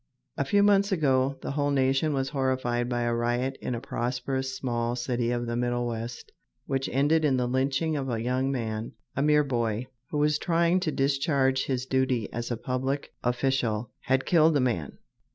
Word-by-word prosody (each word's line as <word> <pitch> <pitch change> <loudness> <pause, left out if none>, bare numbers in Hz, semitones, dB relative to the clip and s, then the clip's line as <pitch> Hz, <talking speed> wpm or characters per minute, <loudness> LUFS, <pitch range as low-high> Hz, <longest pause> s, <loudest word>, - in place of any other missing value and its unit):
A - - -1
few 205 -1 +3
months 200 0 +4
ago 135 -5 +2
the - - -3
whole 145 0 0
nation 135 +2 +2
was 135 -2 -1
horrified 130 -3 0
by 120 -1 -1
a 120 0 +1
riot 120 +3 0
in 125 - -2
a - - -3
prosperous 130 +3 -2
small 120 -2 -1
city 120 -1 -1
of 120 0 -1
the 120 0 -3
Middle 120 0 0
West 115 0 -5 0.3
which 135 -1 -1
ended 145 +5 +2
in 140 -4 +3
the 125 - +1
lynching 135 +5 0
of 135 -2 -2
a 115 -2 -1
young 130 +3 0
man, 110 -4 -3 0.2
a 140 - 0
mere 150 0 +4
boy, 120 -4 -1 0.2
who 150 -1 0
in 150 - +3
trying 170 +1 +2
to 170 -4 -1
discharge 135 -1 +1
his 130 -1 -2
duty 130 -4 0
as 120 0 -3
a 120 - -2
public 130 +4 -2
official 120 -3 0
had 130 0 0
killed 160 -3 +4
a - - +2
man. 115 - -1
130 Hz, 190 wpm, -27 LUFS, 120-140 Hz, 0.3 s, months